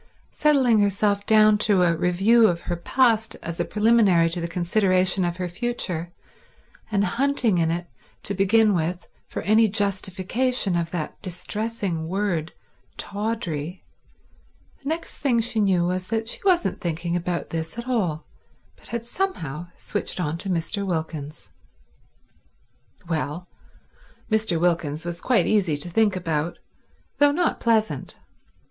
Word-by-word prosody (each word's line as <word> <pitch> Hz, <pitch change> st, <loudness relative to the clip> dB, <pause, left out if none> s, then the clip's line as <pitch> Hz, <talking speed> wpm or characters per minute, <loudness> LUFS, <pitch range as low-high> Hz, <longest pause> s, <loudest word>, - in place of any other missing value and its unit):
Settling 265 Hz, -7 st, +3 dB
herself 200 Hz, 0 st, +1 dB
down 215 Hz, -1 st, +5 dB
to 200 Hz, -3 st, +3 dB
a 170 Hz, -1 st, +3 dB
review 195 Hz, +7 st, +4 dB
of 170 Hz, -3 st, -1 dB
her 175 Hz, -, -3 dB
past 225 Hz, +4 st, +2 dB
as 170 Hz, 0 st, -5 dB
a -, -, +1 dB
preliminary 210 Hz, -6 st, +4 dB
to 175 Hz, 0 st, -2 dB
the 170 Hz, -, -2 dB
consideration 185 Hz, +2 st, +2 dB
of 175 Hz, 0 st, -1 dB
her 180 Hz, -1 st, -2 dB
future, 180 Hz, -4 st, -3 dB, 0.8 s
and 200 Hz, -1 st, +2 dB
hunting 235 Hz, -2 st, +1 dB
in 165 Hz, -1 st, +2 dB
it 175 Hz, +1 st, -2 dB, 0.4 s
to 200 Hz, -, -1 dB
begin 205 Hz, +2 st, +4 dB
with 175 Hz, 0 st, -2 dB, 0.2 s
for -, -, -5 dB
any 220 Hz, +2 st, +4 dB
justification 200 Hz, +2 st, 0 dB
of 170 Hz, -1 st, -1 dB
that 165 Hz, -3 st, -5 dB
distressing 195 Hz, -2 st, -3 dB
word 180 Hz, -3 st, -1 dB, 0.5 s
tawdry, 190 Hz, -6 st, -4 dB, 1.0 s
the 275 Hz, -, -4 dB
next 325 Hz, +1 st, -4 dB
thing 250 Hz, -5 st, +2 dB
she 230 Hz, 0 st, 0 dB
knew 185 Hz, -4 st, +2 dB
was 185 Hz, +1 st, -2 dB
that 225 Hz, 0 st, -2 dB
she -, -, -3 dB
wasn't 365 Hz, -3 st, +2 dB
thinking 170 Hz, 0 st, -2 dB
about 175 Hz, 0 st, -2 dB
this 165 Hz, +4 st, -4 dB
at 235 Hz, +1 st, -6 dB
all, 180 Hz, -11 st, -1 dB, 0.5 s
but -, -, -18 dB
had 235 Hz, -1 st, -4 dB
somehow 175 Hz, -, -3 dB
switched 205 Hz, -, -3 dB
on 160 Hz, -3 st, -1 dB
to 190 Hz, +3 st, -6 dB
Mr. 185 Hz, +3 st, -1 dB
Wilkins. 160 Hz, -5 st, -4 dB, 1.6 s
Well, 160 Hz, +1 st, -3 dB, 0.8 s
Mr. 215 Hz, -6 st, +2 dB
Wilkins 165 Hz, -3 st, 0 dB
was 170 Hz, 0 st, -4 dB
quite 250 Hz, -2 st, +3 dB
easy 185 Hz, -8 st, +2 dB
to 150 Hz, +5 st, -4 dB
think 210 Hz, +1 st, +3 dB
about, 165 Hz, -2 st, -2 dB, 0.6 s
though 290 Hz, 0 st, +6 dB
not 340 Hz, +3 st, 0 dB
pleasant. 220 Hz, -2 st, 0 dB
190 Hz, 140 wpm, -24 LUFS, 170-220 Hz, 1.6 s, though